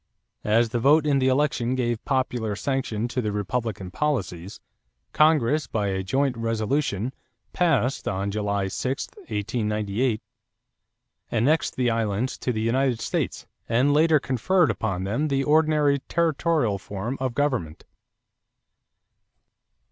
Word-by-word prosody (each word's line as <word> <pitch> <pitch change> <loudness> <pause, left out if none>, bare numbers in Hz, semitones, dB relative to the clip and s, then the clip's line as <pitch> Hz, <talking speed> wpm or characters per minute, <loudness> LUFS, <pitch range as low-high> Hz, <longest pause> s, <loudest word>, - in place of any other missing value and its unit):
As 115 +2 +4
the 120 +1 -1
vote 145 +5 +4
in 140 -2 +3
the 130 - +2
election 130 -2 +1
gave 120 -3 -1
popular 125 -5 -1
sanction 120 -3 -2
to 125 +2 -1
Republican 105 -2 -3
policies, 100 - -2 0.5
Congress 150 -3 +3
by 105 -2 -1
a 95 0 -1
joint 130 +7 0
resolution, 115 +1 -1 0.4
passed 140 -7 +1
on 100 +1 -1
July 100 -1 -1
6, 130 +7 -3
1898, 105 +1 -2 1.1
annexed 135 +8 +1
the 125 -2 +1
islands 115 +2 -1
to 125 - -1
the 110 -2 -2
United 125 +1 +1
States - - -2 0.2
and 125 +5 +3
later 155 +1 +4
conferred 140 +4 +2
upon 100 -4 -2
them 115 +11 -1
the 135 -2 0
ordinary 150 -1 +3
territorial 160 -9 +1
form 105 +7 -5
of 130 -2 -2
government. 130 - -1
120 Hz, 120 wpm, -25 LUFS, 105-140 Hz, 1.1 s, As